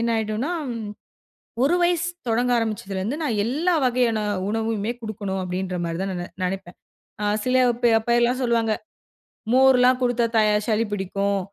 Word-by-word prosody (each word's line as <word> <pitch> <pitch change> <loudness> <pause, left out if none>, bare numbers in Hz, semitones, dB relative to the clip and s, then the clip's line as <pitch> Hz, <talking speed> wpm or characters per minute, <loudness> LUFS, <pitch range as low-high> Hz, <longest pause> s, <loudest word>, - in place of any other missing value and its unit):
என்ன 235 0 0
ஆயிடுன்னா, 220 +8 -2 1.1
ஒரு 295 +6 +3
வயசு 350 0 +1 0.2
தொடங்க 245 +2 +1
ஆரம்பிச்சதுலருந்து 210 0 -2
நான் 240 -8 -1
எல்லா 310 +10 +1
வகையான 245 -3 +2 0.3
உணவுமே 220 0 -1
குடுக்கணும் 200 -3 -4
அப்படின்ற 185 0 -3
மாரி 165 0 -3
தான் 195 0 -2
நான் 175 - -4
நி - - -7 0.2
நினைப்பேன். 180 -1 -5 0.5
அ - - 0 0.2
சில 255 0 +1 0.3
பே 240 - +4
அப்போ 225 +2 -3
எல்லாம் 245 +2 +2
சொல்லுவாங்க, 230 -2 +1 0.8
"மோர்லாம் 255 -1 +5
குடுத்தா 245 -1 +2
தயா 215 -1 +4
சளி 220 0 +1
பிடிக்கும், 200 0 -1
225 Hz, 145 wpm, -23 LUFS, 200-250 Hz, 1.1 s, மோர்லாம்